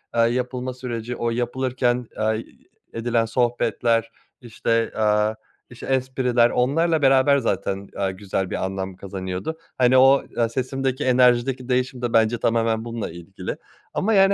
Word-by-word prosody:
eee, 115 - +4
yapılma 125 +2 -1
süreci, 120 -1 -5
o 120 - -1
yapılırken, 125 0 -1
eee, 110 - -2
ı 110 +1 0 0.5
edilen 115 0 0
sohbetler, 115 -1 0 0.3
işte, 115 -1 -1
eee, 105 0 +2 0.3
işte, 120 - -10
espriler 130 -2 +2
onlarla 160 +7 +1
beraber 135 +1 +5
zaten, 100 -4 -2
eee, 95 -1 0
güzel 95 -1 -3
bir - - -2
anlam 95 0 -4
kazanıyordu. 95 - -5 0.2
Hani 130 0 +4
o, 135 +1 +6
eee, 115 -1 +2
sesimdeki, 130 +1 -2
enerjideki 125 0 +3
değişim 125 0 0
de 120 -1 -2
bence 115 +1 +3
tamamen 115 0 +1
bununla 115 -2 -4
ilgili 85 +2 -7 0.4
ama, 220 +3 +1
yani. 195 -1 +5
120 Hz, 140 wpm, -23 LUFS, 110-130 Hz, 0.5 s, o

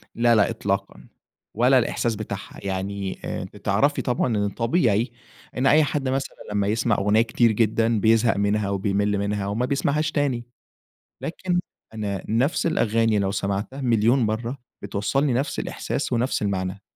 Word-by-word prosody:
لا، 120 0 +4
لأ، 105 - +4
إطلاقًا، 95 -10 -3 0.5
ولا 125 +4 +4
الإحساس 120 -1 -1
بتاعها 105 0 -7
يعني 95 0 -3
آآ، - - -3
بتعرفي 105 +8 +1
طبعًا 125 -1 0
إن 100 0 +1
طبيعي 115 - +1 0.5
إن 130 +2 +2
أي 155 +3 +6
حد 145 -3 -1
مثلًا 135 +1 -2 0.2
لما 100 -1 0
يسمع 115 +2 +1
أغنية 105 +3 +3
كتير 115 0 +2
جدًا 110 0 +2
بيزهق 115 0 +3
منها 100 0 +1
وبيمل 100 +1 0
منها 100 0 -1
وما 110 +5 0
بيسمعهاش 145 +3 0
تاني، 135 -5 0 0.8
لكن 180 +1 -1 0.3
أنا 100 -4 -3
نفس 125 +8 +1
الأغاني 115 -8 +2
لو 95 -1 0
سمعتها 100 +7 -3
مليون 120 +1 +3
مرة 115 +3 -1 0.2
بتوصلني 130 +7 0
نفس 135 +4 -1
الإحساس - - -3
ونفس 120 +3 0
المعنى. 95 -1 -2
110 Hz, 145 wpm, -24 LUFS, 100-125 Hz, 0.8 s, أي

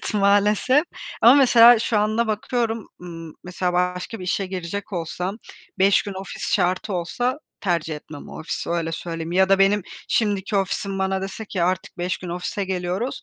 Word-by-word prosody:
Evet, - - -5
maalesef 210 +8 +3 0.4
ama 240 +3 +9
mesela 245 -4 +7
şu 220 -1 0
anda 215 +3 +1
bakıyorum, 225 0 -2
ımm, 165 -3 -9
mesela, 180 0 -2
başka 180 +4 -1
bir 185 - -7
işe 190 +1 -1
girecek 185 +2 -5
olsam, 180 +3 -3 0.4
5 195 +1 +4
gün 200 - -6
ofis 190 0 -5
şartı 185 +2 +1
olsa 245 +10 -1 0.2
tercih 170 -4 -1
etmem 150 0 -11
o - - -9
ofisi, 160 - -4
öyle 165 -1 -1
söyleyeyim. 165 0 -5
Ya 190 +1 +4
da 195 0 +4
benim 195 +1 +4 0.3
şimdiki 205 -2 0
ofisim 195 0 -1
bana 190 0 0
dese 195 +3 -5
ki 190 -4 -3
"artık 185 +1 -1
5 180 +1 -2
gün 180 - -8
ofise 180 +4 -3
geliyoruz" 185 +5 -3
190 Hz, 170 wpm, -23 LUFS, 180-210 Hz, 0.4 s, ama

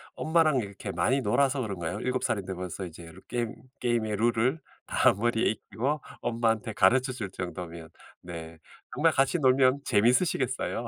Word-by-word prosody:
엄마랑 160 -3 +3
이렇게 100 -2 -5
많이 110 +11 +1
놀아서 135 +5 +2
그런가요? 90 -6 -4
7 130 0 -1
살인데 95 -2 -1
벌써 90 +1 -5
이제 85 -1 -11 0.2
게임 120 -2 -2 0.2
게임의 115 -4 0
룰을 120 +6 +2 0.3
다 130 - +4
머리에 115 +2 +1
익히고 130 +7 -2 0.2
엄마한테 115 -1 0
가르쳐 125 +8 +3
줄 110 -6 -5
정도면 85 -3 -6 0.3
네 80 -2 -8 0.4
정말 160 +2 +3
같이 135 +5 +2
놀면 130 0 +4
재밌으시겠어요. 125 - +1
115 Hz, 335 characters per minute, -28 LUFS, 95-130 Hz, 0.4 s, 다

